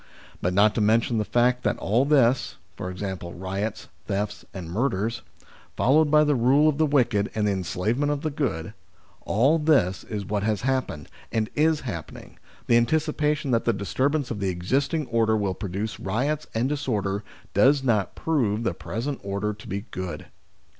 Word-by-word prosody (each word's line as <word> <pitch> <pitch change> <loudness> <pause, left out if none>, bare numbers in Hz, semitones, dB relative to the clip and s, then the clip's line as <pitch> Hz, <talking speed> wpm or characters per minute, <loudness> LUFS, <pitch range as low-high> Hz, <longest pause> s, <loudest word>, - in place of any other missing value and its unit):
But 90 +1 0
not 105 +2 +5
to 110 - 0
mention 115 +2 +2
the - - +1
fact 125 +3 +2
that - - 0
all 115 +7 +1
this 135 -4 +3 0.2
i.e. 95 +1 -4
riots, 95 +5 -4 0.2
thefts, 105 0 -2
and 90 -4 -7
murders, 115 +3 -1 0.6
followed 150 +4 +4
by 150 0 +5
the 150 -1 +2
rule 135 +4 +4
of 150 -1 +1
the 155 - +4
wicked 120 -8 +2
and 105 -1 +1
the - - +2
enslavement 105 - -1
of 145 -1 -2
the 155 - -2
good 115 - -2 0.5
all 135 +10 +3
this 140 - +2
is 105 -2 -4
what 100 +2 -1
has 105 -1 -1
happened, 130 - -1 0.2
and 110 -1 -1
is 155 0 +2
happening, 95 -11 -8 0.3
the 120 - +4
anticipation 150 +2 +1
that 115 -1 +1
the 115 - +3
disturbance 130 +8 -1
of 110 - -3
the 100 -1 0
existing 135 - 0
order 115 -2 +2
will 100 -3 0
produce 100 +3 -4
riots 135 +10 -1
and 120 +4 +1
dis 145 -2 -3
order 100 -3 -1 0.3
does 135 +7 +4
not 110 -6 +1
prove 115 -9 0
the 105 - 0
present 115 - -4
order 100 +2 -2
to 105 - -13
be 100 +2 -3
good. 95 -1 -5
115 Hz, 175 wpm, -25 LUFS, 100-140 Hz, 0.6 s, not